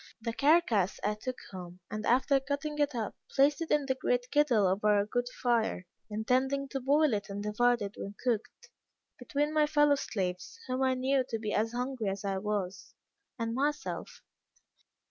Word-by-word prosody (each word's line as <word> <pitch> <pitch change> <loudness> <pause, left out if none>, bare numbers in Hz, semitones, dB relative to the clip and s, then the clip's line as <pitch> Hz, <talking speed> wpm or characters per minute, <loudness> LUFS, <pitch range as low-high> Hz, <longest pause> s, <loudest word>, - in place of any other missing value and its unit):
The 230 0 -3
carcass 275 - +3
I 210 - +1
took 255 +4 -5
home, 180 -1 -9
and 215 0 -3
after 260 +3 +4
cutting 285 +2 -3
it 290 -2 +1
up, 225 -3 -2 0.2
placed 285 +4 +3
it 330 - -3
in 295 -2 +2
the 265 - +1
great 245 -1 -1
kettle 275 -9 +4
over 205 +3 +3
a 200 - +1
good 245 +3 -1
fire, 230 -7 0 0.2
intending 260 +6 0
to 270 - -3
boil 285 +1 +3
it 205 0 -2
and 200 +1 -4
divide 240 +2 +2
it, 200 0 -5
when 200 +1 -6
cooked, 250 - -2 0.5
between 295 +1 -1
my 305 -1 +3
fellow 295 -1 +4
slaves 180 -8 -3
(whom 255 0 -2
I 260 -1 +3
knew 260 +1 +2
to 230 - -1
be 215 -1 -3
as 225 +2 0
hungry 250 -2 -2
as 195 +1 -4
I 195 -1 -1
was) 195 -2 -3 0.4
and 230 -1 -2
myself. 295 +4 -2
245 Hz, 180 wpm, -31 LUFS, 210-275 Hz, 0.5 s, after